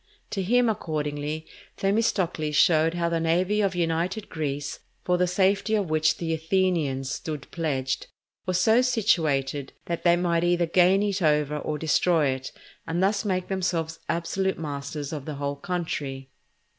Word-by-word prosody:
To 195 - -1
him, 240 +6 +3
accordingly, 155 -5 -2 0.3
Themistocles 190 -7 0
showed 160 +2 +4
how 170 -1 0
the 170 0 0
navy 180 +6 +1
of 195 -2 0
united 175 +4 -1
Greece, 145 -2 -3 0.2
for 180 - +2
the 180 0 +2
safety 195 +4 +2
of 195 -6 -1
which 155 0 +2
the 165 -1 -2
Athenians 160 -6 0
stood 150 -1 -5
pledged, 135 -6 -2 0.4
was 185 -1 +1
so 220 +6 +5
situated 150 - +1
that 170 -1 -3
they 170 -1 +5
might 175 -1 +1
either 175 0 +2
gain 185 +4 +4
it 200 -2 -1
over 150 -2 +2
or 150 0 -3
destroy 160 0 +2
it, 130 0 -4 0.4
and 170 +3 0
thus 200 +2 +2
make 185 -3 -1
themselves 170 -4 -2
absolute 190 +3 -1
masters 145 -1 -5
of 145 -3 -5
the 155 - -5
whole 140 0 -3
country. 140 -5 -4
165 Hz, 155 wpm, -26 LUFS, 150-185 Hz, 0.4 s, so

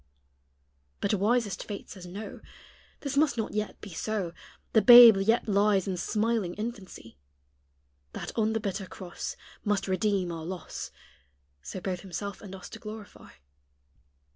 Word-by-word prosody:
But 200 - 0
wisest 210 0 +1
fate 205 -2 -7
says 180 -2 -9
No 200 +5 -7 0.6
This 280 -2 -3
must 285 -4 +3
not 220 - -2
yet 210 0 -3
be 200 - -9
so; 190 -1 -3 0.4
The 220 - +6
babe 240 -3 +11
yet 225 +5 +2
lies 200 -2 +3
in 190 - -1
smiling 210 0 0
infancy 205 - -7 0.9
That - - -6
on 220 -1 +1
the 225 - 0
bitter 195 -2 -4
cross 180 -2 -6 0.3
Must 205 -2 0
redeem 190 -2 0
our 165 -1 -5
loss. 175 -1 -6 0.7
So 80 - -6
both 185 -1 -3
Himself 195 +2 -6
and 195 -2 -8
us 185 - -9
to - - -10
glorify. 215 -1 -10
200 Hz, 140 wpm, -28 LUFS, 185-220 Hz, 0.9 s, babe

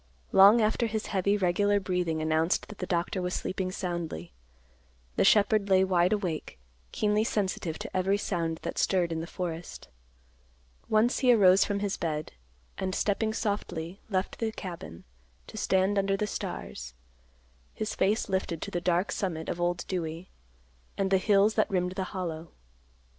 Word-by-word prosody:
Long 200 +4 +8
after 220 +2 +1
his 220 -1 -3
heavy, 200 +2 +2
regular 205 +2 +2
breathing 180 -4 -1
announced 160 +2 +1
that 210 - -10
the 185 - -3
doctor 175 +2 -1
was 180 0 -2
sleeping 185 0 -2
soundly, 170 - -4 0.8
the - - +3
shepherd 205 0 +4
lay 190 0 +5
wide 180 -1 +2
awake, 180 - -2 0.3
keenly 210 0 +1
sensitive 190 -7 -2
to - - -8
every 190 +2 +2
sound 165 -5 -2
that - - -3
stirred 180 -3 +2
in 160 0 -2
the 165 - -6
forest. 170 -1 -6 1.0
Once 220 +3 +3
he 255 -2 +5
arose 195 -4 +6
from 200 -1 -2
his 200 -1 -1
bed, 155 -2 -3 0.5
and 185 0 -2
stepping 215 +2 0
softly 200 -5 -3
left 190 -1 -2
the 225 -1 -1
cabin, 170 - -8 0.4
to - - -12
stand 195 -1 +2
under 195 0 +1
the 210 - 0
stars, - - -6 0.8
his 215 - -3
face 205 +4 +1
lifted 190 -4 -1
to - - -6
the 175 - -2
dark 175 +2 +1
summit 165 -5 -3
of 175 - -3
Old 175 0 0
Dewey 170 -1 -4 0.7
and 195 -1 0
the 190 - +5
hills 205 +2 +4
that 215 - +1
rimmed 180 -2 0
the 190 0 -3
Hollow. 170 -4 -5
185 Hz, 160 wpm, -28 LUFS, 175-205 Hz, 1.0 s, Long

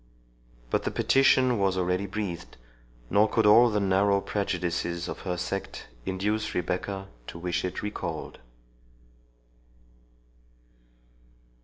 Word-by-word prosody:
But - - +2
the - - -2
petition 130 -3 +3
was 95 -1 +1
already 90 +2 0
breathed, 95 -5 -5 0.5
nor 105 +2 +4
could 110 0 +2
all 115 +4 +7
the 105 -2 0
narrow 100 0 +3
prejudices 85 -4 -2
of - - -5
her 90 -2 -3
sect 95 +2 -5 0.2
induce 105 +3 -1
Rebecca 95 +2 -2 0.2
to - - -7
wish 85 0 -2
it 90 - -4
recalled. 105 0 -5
95 Hz, 110 wpm, -27 LUFS, 90-105 Hz, 0.5 s, all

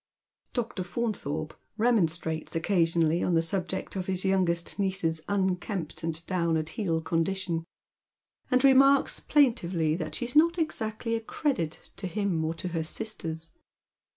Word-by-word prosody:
Dr. 230 -6 -2
Fauntliorpe 175 -6 -3 0.2
remonstrates 170 -10 +1
occasionally 165 -1 +2
on 175 - +1
the 165 - +3
subject 190 +3 -3
of 185 -1 -3
his 185 0 -2
youngest 180 -2 +1
niece's 185 -5 0
unkempt 190 -3 -1
and 165 0 -2
down 170 -3 +1
at 155 0 -2
heel 165 -2 -1
condition, 165 0 -1 0.8
and 255 +1 +3
remarks 275 +1 +5
plaintively 180 - +2
that 155 -3 -4
she - - -2
is 245 - -6
not 335 +3 +5
exactly 230 -8 -2
a 225 - -2
credit 220 - -2
to 190 - -4
him 185 -4 -1
or 160 +1 -1
to 180 +2 -4
her 165 -2 -2
sisters. 165 -4 -4
180 Hz, 140 wpm, -28 LUFS, 165-215 Hz, 0.8 s, remarks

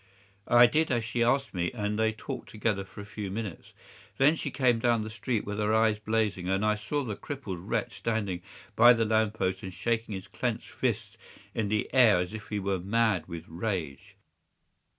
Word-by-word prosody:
"'I 120 0 +8
did 155 +6 +2
as 120 -4 0
she 120 0 -2
asked 135 +4 +1
me, 90 -2 -1
and 105 -2 -2
they 110 0 +3
talked 110 - -7
together 105 -2 -1
for 95 - -11
a - - -9
few 105 -1 -6
minutes. 100 -2 -6 0.5
Then 145 +4 +5
she 155 - -3
came 125 -4 +2
down 115 -1 +2
the 110 - -6
street 110 +1 -2
with 105 +1 -4
her 105 +1 +2
eyes 110 -1 +3
blazing, 105 -4 -1
and 95 +2 +1
I 105 - +4
saw 105 +8 -2
the 110 -5 -4
crippled 120 -11 -6
wretch 105 +2 -3
standing 100 -4 -1 0.3
by 120 +2 +8
the 115 -1 +1
lamp 110 0 +2
post 95 -3 -1
and 95 -3 -6
shaking 110 +3 -2
his 95 - -7
clenched - - -3
fists - - -2 0.3
in 110 - -1
the 105 +1 0
air 120 -7 +6
as 90 +3 -2
if 110 -1 -7
he 105 - -2
were 100 -1 -1
mad 100 -2 +1
with 85 -2 -7
rage. 85 -5 -4
110 Hz, 200 wpm, -29 LUFS, 100-115 Hz, 0.5 s, I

